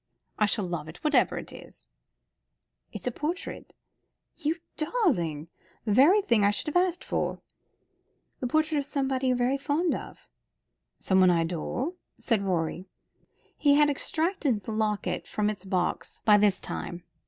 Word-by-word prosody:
"I 210 - +4
shall 205 -1 +1
love 170 -3 -4
it, 160 - -10
whatever 300 -1 +3
it - - -7
is." - - -11 1.0
"It's - - -7
a 250 - 0
portrait." 325 +9 -5 0.6
"You 305 +2 -1 0.2
darling! 190 - 0 0.4
The 210 - +1
very 345 - +6
thing 230 - +3
I 200 - +5
should 245 +8 -2
have 360 +1 +4
asked 350 0 -5
for." - - -2 1.0
"The 250 - -2
portrait 310 +3 +1
of 280 - -3
someone 270 -2 -1
you're 255 +1 +2
fond 300 +5 +1
of." - - -8 0.7
"Someone 190 -1 +4
I 170 -1 +3
adore," 180 - -2 0.3
said 230 -5 +1
Rorie. 180 -1 -2 0.7
He 285 -1 +4
had 295 0 +5
extracted 300 - -1
the 225 - -5
locket 210 -4 -1
from 210 0 0
its 200 -2 -9
box 185 -2 -2
by 210 -1 +7
this 205 -2 +3
time. 175 0 -5
235 Hz, 150 wpm, -28 LUFS, 190-300 Hz, 1.0 s, by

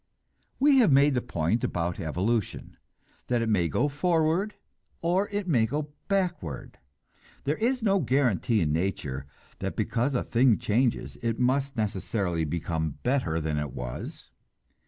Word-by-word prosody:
We 275 0 +6
have 225 - +5
made 140 +1 +5
the 125 - +1
point 105 -1 -1
about 85 0 -1
evolution, 95 +7 -2 0.5
that 120 -2 +1
it 115 - -1
may 90 -6 +2
go 145 - +1
forward 165 +6 +1 0.5
or 185 +4 +1
it 205 -2 -3
may 120 -9 +3
go 145 +4 -3
backward. 180 - -2 0.6
There 145 +3 0
is 245 +2 0
no 200 -2 +3
guarantee 120 - +2
in 75 -3 +1
nature 75 -6 -2 0.3
that - - -3
because 125 +4 0
a - - +1
thing 120 -1 +3
changes, 120 +1 0
it 115 -1 -1
must 135 +2 +1
necessarily 95 -5 -1
become 80 -1 -2
better 125 - +1
than 75 -1 -1
it 75 -3 -4
was. - - -7
120 Hz, 145 wpm, -27 LUFS, -, 0.6 s, We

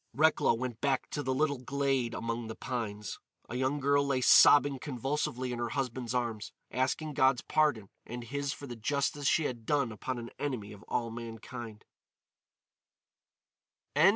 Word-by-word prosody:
Recklow 155 -5 +4
went 120 -1 -4
back 135 -2 0
to 145 - -2
the 130 - -1
little 140 0 +1
glade 135 -2 0
among 115 0 -3
the 110 - -6
pines. 105 -5 -4 0.3
A - - -8
young 130 +3 0
girl 140 +1 +3
lay 140 -2 +1
sobbing 140 +2 +7
convulsively 130 -1 -2
in 120 - -4
her 120 -1 -1
husband's 125 -2 -2
arms, 115 -4 -2 0.2
asking 145 +4 -1
God's 130 -1 +3
pardon 145 -10 +2 0.2
and 120 +1 -6
his 140 +3 -2
for 140 - -7
the 125 -3 -7
justice 140 +4 -1
she 160 - +3
had 120 -5 -3
done 140 -1 +1
upon 125 +4 -4
an 120 0 -7
enemy 125 -8 -3
of 100 - -13
all 115 -1 -1
mankind. 115 -1 -8
130 Hz, 155 wpm, -31 LUFS, 115-140 Hz, 0.3 s, sobbing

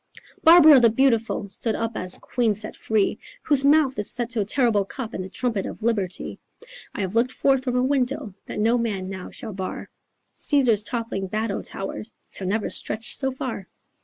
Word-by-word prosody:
"Barbara 315 -4 +9
the 235 -2 +5
beautiful 230 -3 +1
Stood 220 +3 -2
up 230 0 -2
as 185 -3 -1
queen 235 -4 0
set 215 +1 -3
free, 215 -3 0 0.2
Whose 280 -2 +2
mouth 280 -4 +3
is 210 - -1
set 240 -1 -1
to 230 -2 0
a - - -1
terrible 225 -2 +2
cup 230 +3 -7
And 185 - -4
the 185 - -8
trumpet 225 -1 -2
of - - -9
liberty. 205 -6 -2 0.6
'I - - -3
have 190 0 -3
looked 235 +3 +2
forth 270 0 +1
from 250 -2 -2
a 250 - +2
window 260 -5 -1
That - - -6
no 230 +3 +2
man 200 -5 -2
now 190 -1 -7
shall 215 - -7
bar, 190 0 -6 0.4
Caesar's 250 -8 +3
toppling 225 -4 -4
battle 215 +1 -2
towers 205 +3 -5 0.2
Shall 190 - -6
never 210 +3 0
stretch 225 +2 0
so 265 -1 0
far. 250 -7 -5
230 Hz, 190 wpm, -24 LUFS, 205-255 Hz, 0.6 s, Barbara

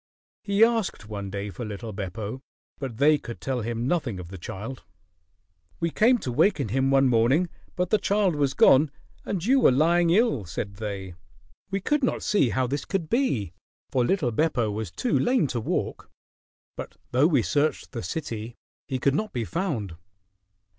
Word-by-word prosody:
He 200 +1 +3
asked 225 - -1
one 100 -2 -5
day 100 +1 -4
for 120 - -7
little 105 +1 -6
Beppo, 105 +5 -5 0.4
but 130 -6 -5
they 150 +3 +5
could 120 -3 -8
tell 130 -2 -2
him 115 +1 -3
nothing 135 - -1
of 85 -2 -8
the 95 - -8
child. 110 +9 -7 1.0
"We 170 - 0
came 240 +7 +4
to 125 - -3
waken 140 - +2
him 135 +4 +1
one 135 0 +4
morning, 130 +9 +3 0.3
but 180 0 -1
the 215 - +4
child 200 -4 +2
was 140 -2 0
gone 140 +3 +6 0.4
and 185 -3 -2
you 265 +4 +4
were - - +6
lying 170 +5 +3
ill," 190 - +3
said 95 +3 -5
they. 100 -4 -5 0.6
"We 195 0 -2
could 295 +7 +1
not 255 - 0
see 200 - +3
how 130 +2 +1
this 140 +3 -2
could 185 -6 -3
be, 135 - 0 0.4
for 130 -3 +2
little 140 -3 +1
Beppo 120 -4 +1
was 105 -2 -4
too 240 - 0
lame 245 -6 +2
to 125 -3 -2
walk; 110 - -3 0.7
but - - -8
though 130 +5 +4
we 140 -9 +3
searched 145 +6 0
the 120 - -4
city, 120 -8 -5 0.3
he 135 - -1
could 135 +2 +2
not 215 +8 -1
be 120 -4 -2
found." 120 - -3
135 Hz, 180 wpm, -26 LUFS, 110-175 Hz, 1.0 s, gone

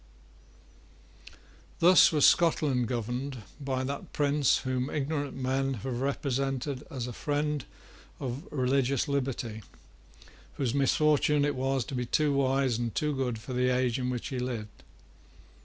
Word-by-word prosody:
Thus 180 +2 +7
was 150 -3 +4
Scotland 145 -7 +3
governed 125 +2 -3 0.2
by 135 -2 -2
that 140 +2 -5
prince 145 -1 +3
whom 130 +1 -1
ignorant 145 0 -2
men 135 +1 -1
have 125 +2 -4
represented 135 0 -2
as 130 -4 -4
a 125 - -6
friend 150 +1 -1 0.5
of 135 +4 -5
religious 135 -1 +1
liberty, 130 -5 -2 0.9
whose 130 -4 -1
misfortune 145 +1 +3
it 145 - 0
was 135 -1 -1
to - - -8
be 125 -2 -2
too 150 +3 +2
wise 135 -3 +1
and 120 -2 -3
too 150 -1 0
good 125 -3 -1
for 115 +4 -8
the 125 0 +2
age 125 -1 +1
in 125 0 -1
which 125 +1 -3
he 130 -3 -3
lived. 115 -4 -5
135 Hz, 140 wpm, -29 LUFS, 125-140 Hz, 0.9 s, Thus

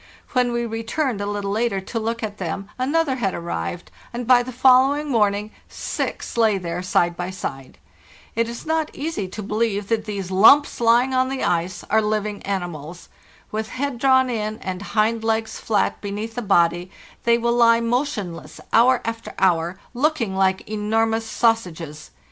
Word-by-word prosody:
When 250 -2 +2
we 235 0 -1
returned 225 +1 -2
a 205 - -2
little 205 -1 -2
later 220 -1 0
to 195 +4 -4
look 230 +1 -3
at 210 -1 -5
them 190 +2 -4
another 280 +1 +1
had 195 -6 -1
arrived, 85 - -5 0.2
and 240 0 -4
by 245 0 +6
the 250 +1 -6
follow 260 +2 +5
ing 295 0 -4
morning 210 -3 +1 0.2
six - - -4
lay 220 -3 +4
there 175 -1 -4
side 175 -1 +1
by 175 +1 -4
side. 135 -8 -6 0.6
It 230 +1 +1
is 235 - -7
not 320 -1 0
easy 290 - -3
to 205 +3 -7
believe 210 -1 -1
that 225 -2 0
these 200 -3 -4
lumps 240 +10 +5
lying 240 +3 +4
on 260 0 +2
the 270 0 -3
ice 175 +2 -1
are 220 +1 +4
living 210 -1 -2
animals. 175 -4 -5 0.4
With 215 0 -3
head 270 -2 -3
drawn 260 0 +4
in 215 -2 -2
and 185 -2 -5
hind 220 +2 0
legs 225 0 -1
flat 210 -3 0
beneath 210 +2 -4
the 245 - -3
body, 175 -3 +2 0.3
they 235 0 +4
will 235 0 +1
lie 230 -1 +5
motionless 230 - -3
hour 245 +2 +5
after 230 0 -5
hour, 175 -1 +2 0.2
locking 255 -6 0
like 190 0 +1
enormous 225 +1 0
sausages. 175 -11 -1
220 Hz, 170 wpm, -22 LUFS, 190-240 Hz, 0.6 s, by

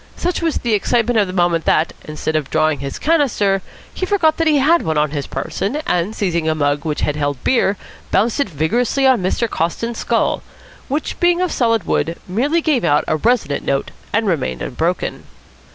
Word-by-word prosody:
Such 355 +1 -2
was 330 -2 0
the 235 -2 -1
excitement 230 +3 +2
of 205 - +2
the - - -5
moment 175 -3 +1
that, 160 - +2
instead 155 +1 -3
of 150 -3 -1
drawing 155 -2 +1
his 140 -1 -5
"canister," 240 -11 +2 0.3
he - - -5
forgot 335 -6 +2
that 330 - +1
he 300 -2 +4
had 315 +5 +4
one 160 -1 -1
on 150 -1 +1
his 145 -3 -3
person, 195 - -3
and, 180 +5 0
seizing 170 -5 0
a 155 - +1
mug 145 -1 0
which 150 -2 -2
had 150 - 0
held 145 -3 -2
beer, 210 -6 +2 0.3
bounced 225 +5 +1
it 280 - +1
vigorously 225 - 0
on 260 -5 +4
Mr. 190 +6 0
Coston's 225 +6 -2
skull, - - 0 0.5
which, 290 +3 -3
being 350 0 +3
of 365 -1 0
solid 230 -5 +1
wood, 165 0 -1
merely 275 - +1
gave 300 -6 +1
out 145 - +3
a - - +1
resonant 210 -8 +1
note 135 0 -1 0.2
and 225 +1 +1
remained 140 - -1
unbroken. - - -2
200 Hz, 195 wpm, -18 LUFS, 155-260 Hz, 0.5 s, he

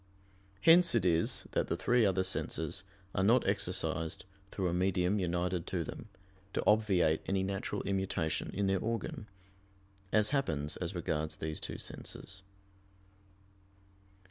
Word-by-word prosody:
Hence 170 -4 +6
it 115 - +2
is 85 -2 +2
that - - 0
the - - -1
three 120 -3 +3
other 95 -1 +1
senses 85 -2 -1 0.3
are 95 - +1
not 115 +5 +4
exercised 90 -5 0 0.2
through 95 -2 -2
a 85 - -1
medium 90 +2 +1
united 90 -1 -1
to - - -1
them, - - -8 0.4
to - - -1
obviate 95 -7 +3
any 95 -1 +1
natural 100 +1 -3
immutation 95 -5 -1
in 100 +1 -1
their 95 -1 +2
organ; 115 - -3 0.8
as 105 +1 +4
happens 80 - 0
as 90 +1 -4
regards 80 -2 -2
these 80 0 -4
two - - -5
senses. 95 0 -5
95 Hz, 135 wpm, -32 LUFS, 85-105 Hz, 0.8 s, Hence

